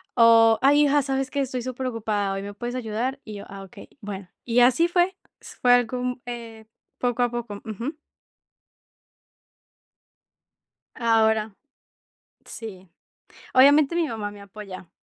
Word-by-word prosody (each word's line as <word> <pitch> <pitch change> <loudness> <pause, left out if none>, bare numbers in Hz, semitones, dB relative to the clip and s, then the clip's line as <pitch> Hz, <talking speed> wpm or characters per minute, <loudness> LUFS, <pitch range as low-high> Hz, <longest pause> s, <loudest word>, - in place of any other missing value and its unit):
o: 230 -1 +6
"Ay, 290 +2 +5
hija, 290 0 +3
¿sabes 270 -1 -2
qué? 280 - -1
Estoy 255 -2 -3
superocupada 230 -5 -2
hoy, 195 - -4
¿me 200 +1 -8
puedes 240 +3 -5
ayudar?". 250 +3 -3
Y 215 -2 -9
yo: 200 - -8
"Ah, 195 0 -9
okey, 190 - -13
bueno". 200 -2 -7 0.2
Y 245 0 +3
así 260 +8 +4
fue. 355 +1 +1 0.2
S - - -13
fue 245 -1 +5
algo, 245 0 +2
mm, 250 0 -3
eh, 230 -2 -8 0.3
poco 245 0 -1
a 245 - +3
poco. 235 -4 -6
Ujú. 235 - -5 3.0
Ahora 220 -2 +2 0.9
Sí. 190 -5 -9 0.7
Obviamente 285 +4 +6
mi 335 -3 +1
mamá 210 -4 -4
me 205 - -12
apoya. 195 -3 -10
235 Hz, 140 wpm, -24 LUFS, 210-255 Hz, 3.0 s, o